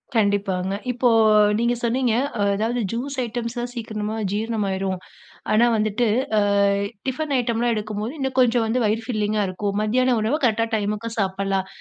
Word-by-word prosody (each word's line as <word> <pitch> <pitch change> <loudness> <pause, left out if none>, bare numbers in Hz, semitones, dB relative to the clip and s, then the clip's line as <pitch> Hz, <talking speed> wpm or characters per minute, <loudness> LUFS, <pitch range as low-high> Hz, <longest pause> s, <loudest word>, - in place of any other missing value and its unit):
கண்டிப்பாங்க. 200 -3 +1 0.2
இப்போ 245 0 +2 0.5
நீங்க 235 +1 +2
சொன்னீங்க. 240 0 +1 0.4
அதாவது 225 +4 -1
ஜூஸ் 265 +5 -3
ஐட்டம்ஸ் 235 +1 -4
தான் 240 0 -3
சீக்கிரமா 220 -2 -4 0.2
ஜீரணமாயிரும். 195 -4 -1 0.5
ஆனா, 215 +2 +5
வந்துட்டு 215 +2 +1 0.6
அ - - +3 0.4
டிஃபன் 285 +3 -2
ஐட்டம்லாம் 235 -1 0
எடுக்கும்போது, 215 +3 -4
இன்னும் 265 -1 -3
கொஞ்சம் 240 -2 +4
வந்து 225 +3 0
வயிறு 215 +2 +1
ஃபில்லிங்கா 215 -2 0
இருக்கும். 200 +2 -3
மத்தியானம் 245 +3 +2
உணவு 225 +8 +1
கரெக்டா 225 -1 +2
டைமுக்கு 210 +2 -2
சாப்புடலாம், 195 -1 -1
220 Hz, 135 wpm, -23 LUFS, 205-240 Hz, 0.6 s, ஆனா